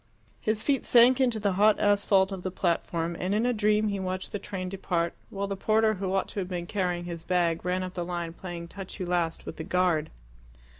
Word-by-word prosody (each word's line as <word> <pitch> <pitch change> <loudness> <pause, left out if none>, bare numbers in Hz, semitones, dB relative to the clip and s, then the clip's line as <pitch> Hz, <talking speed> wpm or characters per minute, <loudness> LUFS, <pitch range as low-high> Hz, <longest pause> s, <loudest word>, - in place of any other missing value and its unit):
His 215 0 -1
feet 280 -2 +1
sank 245 +2 +6
into 240 -4 +2
the 200 -1 +1
hot 210 +3 +4
asphalt 200 -1 +3
of 190 -2 -5
the 185 - -3
platform, 170 -2 -1
and 185 +3 0
in 220 +3 +2
a 245 - +2
dream 210 0 +2
he 200 -1 -2
watched 185 0 -3
the 205 - -3
train 190 -2 -5
depart, 180 -3 -1 0.2
while 200 0 -3
the 200 0 -3
porter 215 +2 +2
who 190 -2 -3
ought 195 0 +1
to - - -4
have 185 - -2
been 175 -2 -3
carrying 180 -2 -1
his 170 -2 -6
bag, 175 -2 +1
ran 180 +1 0
up 185 0 -5
the 175 - -3
line 170 -1 -4
playing 175 -1 -7
touch 195 +3 -8
you 185 - -2
last 175 -2 -1
with - - -7
the 160 - -4
guard. 175 -3 +1
185 Hz, 230 wpm, -28 LUFS, 175-205 Hz, 0.2 s, sank